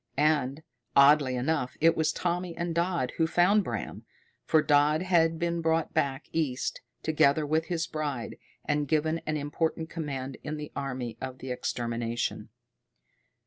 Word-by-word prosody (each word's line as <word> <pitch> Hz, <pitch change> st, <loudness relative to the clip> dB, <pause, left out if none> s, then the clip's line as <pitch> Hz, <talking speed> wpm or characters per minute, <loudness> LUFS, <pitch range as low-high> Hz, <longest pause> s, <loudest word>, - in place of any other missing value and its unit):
And, 145 Hz, -1 st, +1 dB, 0.3 s
oddly 140 Hz, -1 st, +6 dB
enough, 125 Hz, 0 st, -1 dB
it 165 Hz, +1 st, +5 dB
was 160 Hz, -1 st, +2 dB
Tommy 175 Hz, 0 st, -2 dB
and 170 Hz, 0 st, -2 dB
Dodd 170 Hz, -6 st, 0 dB
who 165 Hz, -, +3 dB
found 185 Hz, +5 st, +4 dB
Bram. -, -, -5 dB, 0.4 s
For 155 Hz, -1 st, +3 dB
Dodd 150 Hz, +3 st, +3 dB
had 165 Hz, -3 st, +3 dB
been 170 Hz, 0 st, -1 dB
brought 165 Hz, 0 st, 0 dB
back 135 Hz, +1 st, 0 dB
east, 140 Hz, -6 st, -1 dB, 0.2 s
together 155 Hz, -1 st, +3 dB
with 160 Hz, +2 st, +1 dB
his 170 Hz, -2 st, -1 dB
bride, 145 Hz, -6 st, -4 dB, 0.3 s
and 145 Hz, 0 st, 0 dB
given 155 Hz, +2 st, +1 dB
an 155 Hz, 0 st, 0 dB
important 160 Hz, +2 st, -2 dB
command 135 Hz, -5 st, -4 dB
in 155 Hz, +1 st, -4 dB
the 150 Hz, 0 st, -7 dB
Army 125 Hz, -4 st, -4 dB
of 130 Hz, 0 st, -6 dB
Extermination. 120 Hz, -2 st, -3 dB
155 Hz, 145 wpm, -28 LUFS, 135-165 Hz, 0.4 s, oddly